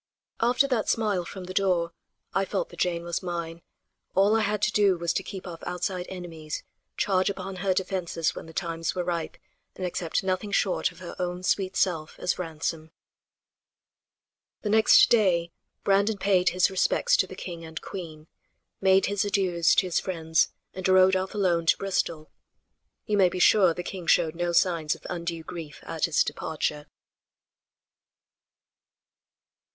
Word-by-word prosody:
After 245 +4 +3
that 245 -5 0
smile 210 -5 +1
from 190 +1 -8
the 185 +1 -7
door 180 -4 +1 0.4
I 195 - +2
felt 195 - -2
that - - -13
Jane 170 -1 0
was 170 0 -3
mine; 170 -2 -5 0.5
all 200 +3 +4
I - - +3
had 210 -1 0
to 215 - +3
do 200 -4 +3
was 170 0 -1
to - - 0
keep 190 0 -8
off 170 -3 -8
outside 180 +1 -3
enemies, 165 -5 -6 0.3
charge 185 -1 +2
upon 195 -1 -5
her 190 +1 0
defenses 180 -3 -1
when - - -9
the - - -10
times 165 0 -3
were 180 - -1
ripe 170 -2 -3 0.4
and 185 - -4
accept 175 0 -2
nothing 190 +2 -2
short 195 -1 +1
of - - -18
her 175 - -7
own 180 0 -3
sweet 190 0 0
self 160 -5 0
as 180 - -1
ransom. 160 -1 -4 1.7
The 210 - -1
next 220 0 +7
day 180 -7 +3 0.3
Brandon 200 +2 +2
paid 190 -2 +3
his 185 +2 +2
respects 485 - +2
to - - +2
the - - -9
king 170 -2 -7
and 160 0 -7
queen, 160 -5 -8 0.6
made 190 0 +4
his 205 -1 0
adieus 185 -5 +2
to - - +3
his 180 - +1
friends 160 -4 +1 0.2
and 185 0 -3
rode 185 0 +6
off 190 +2 -2
alone 175 -5 +1
to - - +5
Bristol. 170 -5 -2 0.7
You 210 -2 0
may 190 -2 +5
be 180 - -5
sure 180 -2 +5
the 180 - -4
king 180 -2 -7
showed 165 -2 +3
no 175 0 -1
signs 170 -3 +2
of - - -18
undue 170 -2 -4
grief 160 -3 -8
at 165 -2 -1
his 165 -3 +3
departure. 150 -1 -3
180 Hz, 165 wpm, -26 LUFS, 170-195 Hz, 1.7 s, next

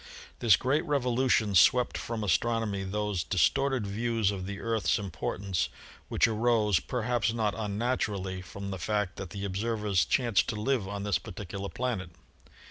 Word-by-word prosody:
This 115 -6 +6
great 140 +5 +1
revolution 125 -6 +2
swept 125 +7 +5
from 115 -2 -3
Astronomy 105 +1 0
those 100 -2 -2
dis 90 -4 +4
torted 135 -5 0
views 110 0 0
of 95 -2 -5
the 100 0 -5
Earth's 115 -2 +1
importance 95 -1 -2 0.4
which - - +3
arose, 110 -4 +2
per 125 -3 -3
haps 120 -1 +1
not 110 -3 0
unnaturally, 105 -4 -2
from 100 +2 -7
the 95 - -5
fact 105 0 -1
that 95 - -6
the 100 +2 -5
observers 105 -1 0
chanced 120 -6 +2
to 110 - -2
live 110 -1 0
on 100 0 -4
this 100 -5 +1
particular 100 +2 -6
planet. 105 -3 -3
105 Hz, 155 wpm, -29 LUFS, 100-120 Hz, 0.4 s, This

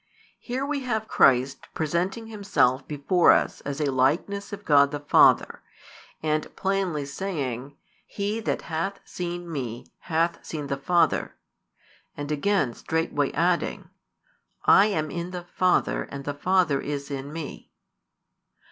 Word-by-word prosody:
Here 260 +3 -3
we 285 0 -1
have 220 -5 -2
Christ 130 - +3
presenting 175 +8 -1
Himself 200 - +1
before 155 +5 +4
us - - 0
as 140 0 -5
a 145 -2 +1
Likeness 160 +11 0
of 205 0 -8
God 140 -2 +5
the 145 0 -4
Father, 145 - +4 0.6
and 155 0 -1
plainly 190 -7 -1
saying: 140 -5 -4 0.3
He 205 +2 -2
that 225 - -2
hath 170 +5 -3
seen 175 0 -5
Me 125 -5 -4 0.2
hath 165 +1 0
seen 150 -3 -5
the 140 0 -2
Father, 170 +3 +1 0.8
and 145 +1 -4
again 150 -4 +1
straightway 155 -1 -1
adding: 170 +2 0 0.7
I 200 - +7
am 155 -7 -1
in 170 0 -4
the 180 -1 -6
Father, 180 +1 +1
and 140 0 -8
the 145 - -2
Father 160 -2 +2
is 145 0 -4
in 140 +1 -5
Me. 160 -2 -7
160 Hz, 135 wpm, -25 LUFS, 140-190 Hz, 0.8 s, I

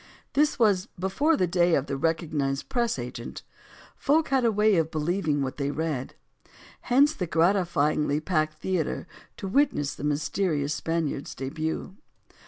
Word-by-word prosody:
This 300 +2 +2
was 205 -5 +3
before 270 - +1
the 185 - +2
day 175 -1 +3
of 135 - 0
the 140 - -3
recognized 150 -2 -1
press 240 - 0
agent. 120 -1 -7 0.5
Folk 305 +3 +2
had 265 -2 +2
a 230 - +4
way 210 -1 +3
of 160 -1 +1
believing 155 -2 0
what 130 - -4
they 140 -1 -1
read. 150 -4 -3 0.7
Hence 280 +5 +5
the 180 - -3
gratifyingly 160 -4 +2
packed 155 -2 0
theater 180 -1 -2 0.3
to 195 - -5
wit 275 +7 +3
ness 145 -1 -2
the - - -9
mysterious 150 0 0
Spaniard's 160 -2 -2
debut. 160 +7 -4
165 Hz, 150 wpm, -26 LUFS, 150-200 Hz, 0.7 s, Hence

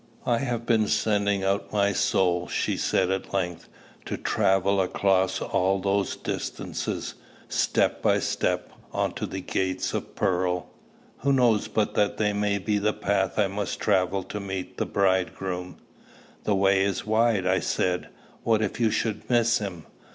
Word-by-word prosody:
"I 120 -1 +2
have 120 -3 -2
been 110 -3 +3
sending 100 -2 +1
out 95 +1 0
my 100 -1 +2
soul," 90 -3 +1
she - - -1
said 95 0 +1
at 95 +1 -3
length, 90 -3 -2 0.4
"to - - -3
travel 95 +1 +2
all - - +5
across 95 0 +2 0.5
those 100 0 +1
distances, - - -4 0.3
step - - +1
by - - +3
step, - - -1 0.2
on - - 0
to - - -4
the 95 - -5
gates 95 0 -1
of - - -4
pearl. 90 -1 0 0.5
Who 140 +3 +1
knows 120 -6 +3
but 110 -1 0
that 105 - +1 0.2
may 105 0 +1
be 105 +1 0
the 105 +1 +1
path 95 -1 0
I 105 - +4
must 100 +1 -3
travel 95 +1 +1
to 105 - -6
meet 95 -2 -5
the - - 0
Bridegroom?" 95 -1 -1 0.7
"The 105 - +2
way 95 0 +3
is 100 -2 -1
wide," 110 -2 +2
I 95 0 +3
said: 90 -1 -1 0.3
"what 110 -1 +2
if 105 - -3
you 115 -2 +3
should 110 0 -2
miss 120 -1 +3
him?" 90 -6 -6
100 Hz, 160 wpm, -26 LUFS, 95-105 Hz, 0.7 s, all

